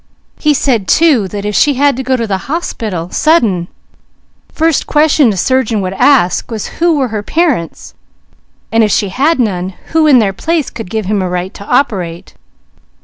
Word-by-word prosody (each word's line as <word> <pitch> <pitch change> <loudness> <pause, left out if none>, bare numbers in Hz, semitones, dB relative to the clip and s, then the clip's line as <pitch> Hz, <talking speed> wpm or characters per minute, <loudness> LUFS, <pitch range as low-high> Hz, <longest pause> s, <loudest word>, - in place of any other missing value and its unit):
He 300 -1 +2
said 235 -8 0
too, 295 -11 +3
that 200 +1 -6
if 210 - -2
she 290 +6 +2
had 285 +1 +2
to 260 - -4
go 260 0 0
to 230 - -2
the 195 -3 -2
hospital, 215 - -4
sudden, 225 - +1 0.8
first 320 -1 0
question 300 -4 +3
a 195 - -4
surgeon 245 0 0
would 185 0 -3
ask 230 -4 +2
was 220 -3 -6
who 340 -2 +3
were 265 -3 0
her 215 -1 -3
parents, 285 - -2 0.8
and 225 0 +3
if 215 - +2
she 200 +1 0
had 285 - +1
none, 185 -5 -2 0.2
who 320 -1 +3
in 280 -4 +6
their 205 -5 +1
place 320 - -2
could 225 -5 -8
give 220 0 -3
him 205 +1 -1
a 185 - -2
right 180 +1 -4
to - - -10
operate. 190 -9 -1
225 Hz, 185 wpm, -13 LUFS, 195-290 Hz, 0.8 s, in